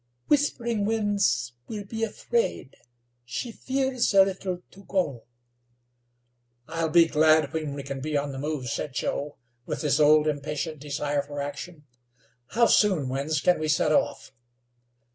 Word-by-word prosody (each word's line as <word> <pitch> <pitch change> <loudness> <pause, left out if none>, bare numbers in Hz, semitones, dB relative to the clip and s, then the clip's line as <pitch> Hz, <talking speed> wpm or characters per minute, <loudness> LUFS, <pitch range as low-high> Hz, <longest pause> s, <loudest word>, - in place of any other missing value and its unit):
"Whispering 235 -7 +1
Winds 205 - +1
will 210 -2 -5
be 220 +3 -6
afraid; 225 - -2 0.5
she 130 - -5
fears 265 +1 0
a 195 - +9
little 185 -2 -4
to 195 - -15
go." 145 - -1 1.4
"I'll 165 0 -1
be 170 +1 +6
glad 155 0 +3
when 155 -3 -3
we 140 - -6
can 135 0 -5
be 150 +2 -1
on 140 0 -2
the 135 - -6
move," 145 -3 -3
said 135 +3 -4
Joe, 145 +3 -2 0.3
with - - -3
his 150 0 +2
old 150 +1 +6
impatient 150 +1 -3
desire 145 0 -1
for 145 0 -7
action. 145 +2 -6 0.6
"How 235 - +3
soon, 185 - +3
Winds, 140 +3 -1
can 180 - +3
we 155 - -1
set 150 - +2
off?" - - 0
155 Hz, 145 wpm, -26 LUFS, 145-200 Hz, 1.4 s, a